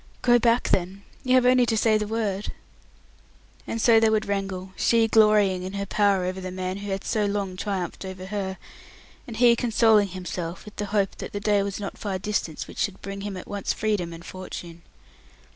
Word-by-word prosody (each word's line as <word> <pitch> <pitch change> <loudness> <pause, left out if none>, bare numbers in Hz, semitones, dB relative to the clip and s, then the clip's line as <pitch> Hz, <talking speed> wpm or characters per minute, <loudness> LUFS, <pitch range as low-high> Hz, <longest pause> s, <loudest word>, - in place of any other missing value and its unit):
"Go 240 -1 +5
back, 235 +1 +2
then. 190 +2 0 0.2
You 255 -1 +3
have 255 -1 +4
only 250 -1 +5
to 225 - +1
say 220 0 +3
the 210 - -2
word!" 210 -3 -2 1.2
And 230 - -3
so 225 0 +6
they 225 0 +4
would 220 0 +1
wrangle, 195 -2 -3
she 230 -1 +3
glorying 210 -4 +4
in 185 +1 -6
her 200 0 -3
power 200 -2 +2
over 185 +1 -3
the 185 - -5
man 185 +1 -4
who 200 0 -6
had 195 0 -3
so 210 -2 0
long 200 -2 -2
triumphed 195 -2 -3
over 190 -1 -7
her, 190 -1 -4 0.7
and 230 -3 -7
he 240 0 +6
consoling 225 -3 +3
himself 180 -2 -6
with 210 - -12
the 205 - -2
hope 200 -2 0
that - - -7
the 205 - -2
day 205 0 +2
was 200 0 -3
not 200 -1 -6
far 200 -3 -2
distant 185 -5 -2
which - - -10
should 200 -3 -1
bring 195 0 -6
him 200 -1 -5
at 185 - -9
once 200 -1 -2
freedom 205 -6 -1
and 165 0 -10
fortune. 175 -2 -8
200 Hz, 205 wpm, -25 LUFS, 185-215 Hz, 1.2 s, so